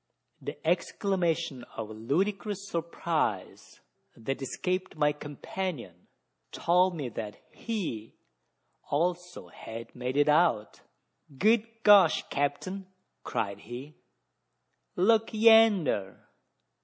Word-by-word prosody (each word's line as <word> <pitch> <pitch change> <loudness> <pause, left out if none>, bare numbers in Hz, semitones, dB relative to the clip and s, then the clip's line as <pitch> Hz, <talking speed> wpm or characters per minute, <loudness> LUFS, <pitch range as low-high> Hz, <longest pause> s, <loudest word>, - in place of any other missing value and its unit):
The - - -6
exclamation 170 - 0
of 110 -1 -5
ludicrous 195 - -2
surprise, 170 -1 -3 0.4
that 135 +5 -4
escaped 185 +7 -3
my 150 -1 +3
companion, 145 - -6 0.4
told 180 +1 +2
me 145 -5 -3
that 105 -2 -7
he 170 - -5 0.7
had - - 0
also 175 - -2 0.4
made 125 +2 -3
it 145 0 +4
out. 150 -9 +2 0.6
"Good 225 - +1
gosh, 200 -5 +6
capt'n!" 185 +7 -2 0.4
cried 100 -4 -3
he, 125 +8 -9 1.0
"look 220 +4 +3
yander! 215 - +4
165 Hz, 90 wpm, -29 LUFS, 130-195 Hz, 1.0 s, gosh